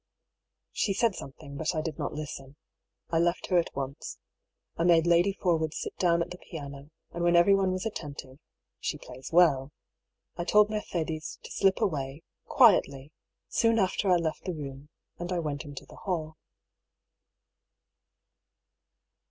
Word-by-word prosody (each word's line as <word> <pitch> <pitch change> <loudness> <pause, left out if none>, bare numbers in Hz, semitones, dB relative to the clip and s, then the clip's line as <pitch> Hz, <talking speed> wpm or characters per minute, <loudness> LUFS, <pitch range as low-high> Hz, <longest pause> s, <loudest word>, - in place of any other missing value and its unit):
She 195 - 0
said 230 -1 +2
something, 140 -2 -9
but 160 +3 -1
I 155 - +1
did 155 -2 -5
not - - -2
listen. 145 -2 -7 0.6
I 165 - +3
left 175 +1 +1
her 180 - +6
at 170 - -3
once. 135 0 -5 0.6
I 165 - 0
made 170 -1 +5
Lady 175 +3 +4
Forwood 165 -5 0
sit - - -4
down 170 -2 +3
at - - -10
the 180 - -8
piano, 140 -2 -9 0.2
and 170 - -3
when 175 0 +4
everyone 190 +2 +5
was 185 +3 -3
attentive 145 -9 -6 0.4
(she - - -2
plays 130 +1 -10
well) 145 -6 +4 0.7
I 175 - -1
told 210 +3 +4
Mercedes 165 -7 -3
to - - -10
slip 195 -1 +2
away, 145 -6 -2 0.2
quietly, 150 - +4 0.4
soon 230 0 +2
after 195 -1 +1
I - - +7
left 165 -2 -1
the 180 -2 -2
room, 140 -1 -8 0.3
and 175 +1 -4
I 180 - 0
went 150 -3 -3
into 145 -2 -9
the - - -15
hall. 160 -5 -3
165 Hz, 150 wpm, -29 LUFS, 145-180 Hz, 0.7 s, I